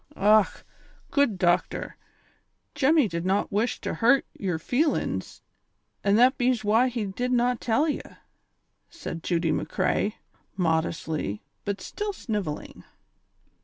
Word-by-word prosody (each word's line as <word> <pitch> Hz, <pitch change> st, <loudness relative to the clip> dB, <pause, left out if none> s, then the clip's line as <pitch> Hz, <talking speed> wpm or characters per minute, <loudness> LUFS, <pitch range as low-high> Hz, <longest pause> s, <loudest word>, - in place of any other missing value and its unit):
"■Och! 210 Hz, +1 st, +3 dB, 0.5 s
good 280 Hz, -9 st, +2 dB
dochter, 175 Hz, 0 st, 0 dB, 0.8 s
Jemmy 290 Hz, -2 st, +4 dB
did 170 Hz, -3 st, -4 dB
not 190 Hz, +2 st, 0 dB
wish 215 Hz, +4 st, 0 dB
to -, -, -3 dB
hurt 245 Hz, +4 st, +3 dB
j^er 180 Hz, -5 st, -1 dB
feelin's, 285 Hz, -, -1 dB, 0.6 s
an' 200 Hz, 0 st, +3 dB
that 250 Hz, +5 st, +5 dB
bees 245 Hz, -2 st, +2 dB
why 220 Hz, +5 st, +4 dB
he 235 Hz, -4 st, -2 dB
did 245 Hz, +6 st, -3 dB
not 245 Hz, 0 st, +2 dB
tell 255 Hz, +7 st, +2 dB
ye," 300 Hz, -, -1 dB, 0.9 s
said 165 Hz, -, -7 dB
Judy 165 Hz, -1 st, 0 dB
McCrea, 205 Hz, +6 st, 0 dB, 0.4 s
modestly, 160 Hz, -, -1 dB, 0.2 s
but 200 Hz, 0 st, -3 dB
still 415 Hz, 0 st, -4 dB
snivelling. 205 Hz, -, -4 dB
215 Hz, 120 wpm, -26 LUFS, 180-250 Hz, 0.9 s, that